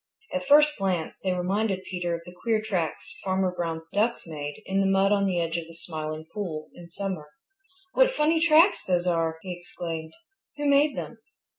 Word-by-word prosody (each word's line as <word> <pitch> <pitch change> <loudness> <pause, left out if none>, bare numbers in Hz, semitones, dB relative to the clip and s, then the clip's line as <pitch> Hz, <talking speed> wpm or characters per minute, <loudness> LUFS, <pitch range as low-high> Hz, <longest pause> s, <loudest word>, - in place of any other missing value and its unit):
At 275 0 -2
first 300 -1 +6
glance 185 -4 -1
they 190 - -1
reminded 190 +2 0
Peter 175 -2 -2
of 170 - -8
the 175 - -10
queer 225 -2 +2
tracks 185 -7 -3
Farmer 190 -1 +1
Brown's 165 -2 -3
ducks 220 +4 +1
made 145 -3 -6
in 195 +1 0
the 195 - +3
mud 195 +1 +3
on 200 -1 +3
the 180 -2 +1
edge 165 0 -1
of 165 - -8
the 165 - -12
Smiling 155 -2 -5
Pool 170 -7 -4
in 170 -1 -12
summer. 180 -4 -4 0.6
"What - - +5
funny 320 -7 +2
tracks 330 +3 +5
those 180 -1 +1
are!" 165 -2 +1
he 185 -2 -4
exclaimed. 165 -2 -6 0.4
"Who 290 - -2
made 285 0 +4
them?" 230 - -6
185 Hz, 185 wpm, -27 LUFS, 165-220 Hz, 0.6 s, first